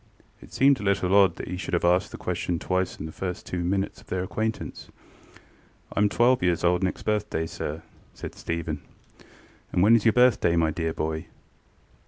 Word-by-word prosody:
ŌĆØ - - -15
It - - -20
seemed 135 0 +4
a - - -6
little 95 -2 +1
odd 100 -4 +5
that - - -7
he 90 - -4
should 90 - -2
have 85 - 0
asked 90 +1 +3
the - - -8
question 90 - -2
twice 95 +2 -1
in - - -5
the 80 - -6
first 90 +2 -5
two 90 -1 -3
minutes 95 +2 -1
of - - -21
their 90 0 -2
acquaintance. 110 +4 -4 1.1
ŌĆ£IŌĆÖm 105 0 +3
twelve 120 +4 +3
years 90 -1 +1
old 90 0 +3
next 95 -1 -2
birthday, 105 -6 -1
sir, 80 0 -5
ŌĆØ - - -29
said - - -7
Stephen. 80 -3 -4 0.9
ŌĆ£And 90 - +1
when 110 +3 +7
is 115 - +2
your 110 - +4
birthday, 125 -9 +4
my 80 -1 +2
dear 80 +1 -2
boy? 80 0 -3
90 Hz, 200 wpm, -26 LUFS, 85-105 Hz, 1.1 s, when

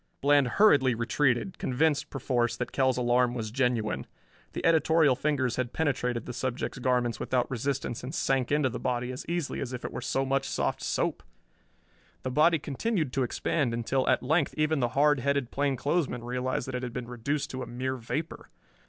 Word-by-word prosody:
Bland 145 -1 +4
hurriedly 140 - +5
retreated, 125 +7 0
convinced 145 +3 +1
perforce 120 -3 0
that 125 - -4
Kell's 130 -2 +2
alarm 125 0 +2
was 110 -3 -4
genuine. 120 - 0 0.5
The - - -4
editorial 160 -3 +4
fingers 130 -3 0
had 125 -1 -2
penetrated 125 -6 -1
the 125 - -6
subject's 125 +1 -3
garments 125 -3 +1
without 125 0 0
resistance 130 -1 -2
and 125 - -5
sank 135 -5 0
into 145 -2 +3
the 125 - -5
body 125 0 -1
as 130 - -7
easily 170 -4 -2
as 130 -2 -4
if 125 - -5
it - - -4
were - - -4
so 135 +2 0
much 135 0 0
soft - - -1
soap! - - -1 1.0
The 130 - -2
body 160 +5 +4
continued 155 - -2
to 135 - 0
expand 125 0 0
until 130 +3 0
at 130 - +2
length 155 +3 +1
even 155 0 +2
the 120 -2 +1
hard 145 -1 +4
headed 140 -1 0
plainclothesman 140 -1 0
realized 125 +2 -2
that 130 - -5
it 125 - -2
had 125 -2 -5
been 125 -2 -5
reduced 125 +5 -2
to 130 - -5
a 125 - -5
mere 130 +2 -3
vapor. 150 +7 -5
130 Hz, 185 wpm, -28 LUFS, 125-145 Hz, 1.0 s, hurriedly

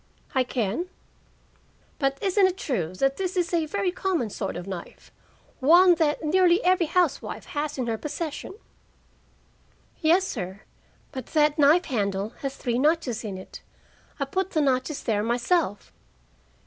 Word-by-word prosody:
"I 260 - +3
can." 245 - -2 1.1
"But 275 -2 +1
isn't 390 0 +4
it 375 0 -3
true 185 - -2
that 270 +7 +1
this 370 -1 -2
is 350 -1 0
a 330 -2 +1
very 390 +2 -1
common 350 - -1
sort - - -4
of 175 - -6
knife? 185 -3 -8 0.5
One 350 +6 +7
that 305 -1 +1
nearly 355 +4 +4
every 360 -2 +3
housewife 345 -2 0
has 295 0 -3
in 255 - -1
her 225 -2 -2
possession?" 315 +4 -5 1.4
"Yes, 350 +4 +3
sir. 190 - -5 0.5
But 260 -2 -7
that 300 -1 +2
knife 305 +5 +5
handle 200 - -1
has 275 -1 -3
three 240 -1 -1
notches 285 -6 +1
in 200 -4 -5
it. 185 - -10 0.6
I 275 - 0
put 375 +7 -2
the 315 - +1
notches 270 +1 0
there 210 -3 +1
myself." 240 - 0
295 Hz, 150 wpm, -26 LUFS, 235-350 Hz, 1.4 s, One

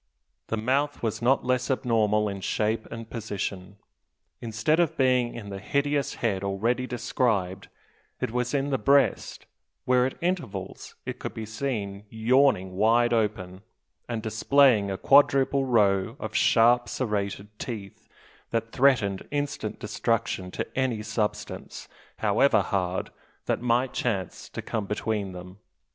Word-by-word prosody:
The 110 - -2
mouth 135 +6 0
was 110 -1 -2
not 125 +3 +2
less 125 +1 0
abnormal 110 -5 +2
in 100 -1 -5
shape 110 +3 -1
and 115 -1 -7
position. 100 -3 -5 0.6
Instead 115 +8 0
of 170 -4 +1
being 125 -2 +2
in 110 -4 -7
the 100 - -5
hideous 140 +5 0
head 100 -5 -1
already 115 +6 0
described, 105 -6 -1 0.5
it - - -2
was 125 +3 -1
in 140 +1 0
the 135 - +1
breast, 140 0 +2 0.4
where 125 0 +3
at 130 - -6
intervals 160 - -4
it - - -5
could - - -6
be 110 - -5
seen 105 -4 -4
yawning 110 -5 +2
wide 120 +3 +4
open, 100 -5 -1 0.5
and 115 -2 -3
displaying 110 -1 +4
a 95 - -2
quadruple 140 +1 +4
row 100 -6 +2
of - - -5
sharp 120 +1 +4
serrated 105 -4 -2
teeth, 105 -6 -7 0.4
that 115 0 -2
threatened 120 -8 +2
instant 145 -7 -3
destruction 110 -3 -1
to - - -3
any 125 -5 0
substance, 110 -1 -4 0.3
however 110 +6 +3
hard, 95 -3 -2 0.3
that - - -1
might 125 +1 +1
chance 100 -7 -3
to - - -6
come 105 -3 -3
between 105 -1 -2
them. 90 +2 -10
115 Hz, 135 wpm, -26 LUFS, 100-130 Hz, 0.6 s, wide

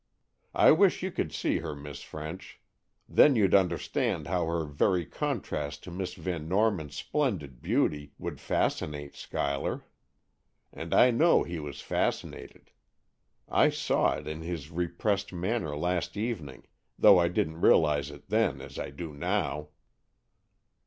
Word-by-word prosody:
I - - +7
wish 180 +3 +4
you 190 - -2
could 80 - -2
see - - 0
her, 75 - -5
Miss 70 -1 -9
French. - - -8 0.5
Then 145 - +6
you'd 100 -5 +3
understand 90 -4 +1
how 90 -3 -1
her 85 -1 -1
very 85 +5 +1
contrast 110 - -3
to 90 - -9
Miss 90 +1 -4
Van 85 -4 -4
Norman's 95 -7 +1
splendid 90 - -2
beauty 75 -1 0
would - - -6
fascinate 75 -1 -2
Schuyler. 70 -1 -3 0.9
And - - -7
I 125 - +7
know 160 +8 +4
he 85 -1 -5
was 75 -2 -7
fascinated. - - -3 0.8
I - - +4
saw - - +1
it 75 - -8
in 80 +1 -5
his 80 -2 -5
repressed 90 +4 -1
manner 90 -4 -2
last 90 +4 -1
evening, 100 - -4 0.3
though 95 - +7
I 85 - +3
didn't 80 -1 -2
realize 75 -3 +4
it 75 0 -13
then - - +1
as - - -9
I - - -4
do 75 +3 -7
now." 80 -2 -2
85 Hz, 140 wpm, -29 LUFS, 75-100 Hz, 0.9 s, I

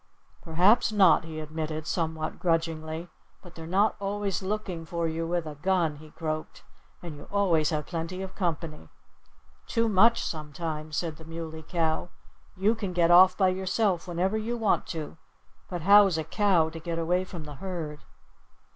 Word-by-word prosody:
"Perhaps 185 +8 +3
not!" 190 -6 +5
he 160 -1 -6
admitted 155 0 -4
somewhat 160 -2 -2
grudgingly. 165 -1 -1 0.4
"But 175 -2 -13
they're 160 -1 -9
not 200 +5 +2
always 200 -1 -2
looking 190 -4 -3
for 170 +1 -2
you 165 +1 -2
with 175 -1 -1
a 155 - -6
gun," 165 -1 0
he 155 +1 -13
croaked. 155 -1 -5 0.4
"And 165 -3 -7
you 145 - -12
always 175 -7 +2
have 150 -2 -2
plenty 170 +2 -4
of 190 - -7
company." 165 -4 -3 0.8
"Too 230 -1 +1
much, 225 +3 +4
sometimes," 155 0 -5
said 160 -3 -2
the 160 - -13
Muley 160 -1 -7
Cow. 160 +1 -1 0.5
"You 200 +4 +3
can 205 -5 -4
get 175 -1 +3
off 185 +1 +7
by 190 -2 +4
yourself 185 0 0
whenever 185 +5 0
you 235 +2 -3
want 220 -3 +1
to. 160 -2 -6 0.5
But 175 -3 -4
how's 200 -2 +6
a 160 - -1
cow 175 -1 +2
to 165 - -7
get 165 0 -4
away 175 +2 +1
from 175 -3 -8
the 150 -2 -10
herd?" 165 -6 -5
170 Hz, 165 wpm, -27 LUFS, 160-190 Hz, 0.8 s, off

